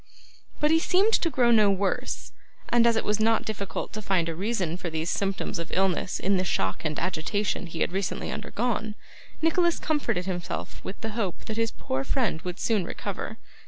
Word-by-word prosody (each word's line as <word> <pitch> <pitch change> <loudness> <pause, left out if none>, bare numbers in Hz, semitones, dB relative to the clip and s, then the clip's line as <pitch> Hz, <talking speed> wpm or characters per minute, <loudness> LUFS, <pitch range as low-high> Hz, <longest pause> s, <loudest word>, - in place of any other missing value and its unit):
But 300 +1 +3
he 325 - +6
seemed 385 +6 +3
to 335 - +3
grow 245 -5 +3
no 215 -3 +6
worse, 195 0 -1 0.4
and, 235 0 +5
as 230 - +4
it 225 - 0
was 210 +1 +1
not 225 +1 +3
difficult 200 -3 -4
to 215 - -4
find 185 -5 +1
a 165 - -1
reason 185 -2 -1
for 180 -1 -4
these 160 +1 -1
symptoms 195 -3 -1
of 170 - -5
illness 190 0 +1
in 195 +1 +2
the 185 - +1
shock 95 - -1
and 155 -2 -1
agitation 185 +3 -1
he 165 - -6
had - - +2
recently 190 0 -2
undergone, 220 0 -2 0.5
Nicholas 340 +1 +3
comforted 290 - 0
himself 180 -2 -4
with 195 - -6
the 225 - -2
hope 210 -5 -3
that 220 - -4
his 230 0 +2
poor 130 -8 -3
friend 205 - 0
would 180 0 -5
soon 215 -5 +2
recover. - - -5
200 Hz, 195 wpm, -27 LUFS, 180-230 Hz, 0.5 s, he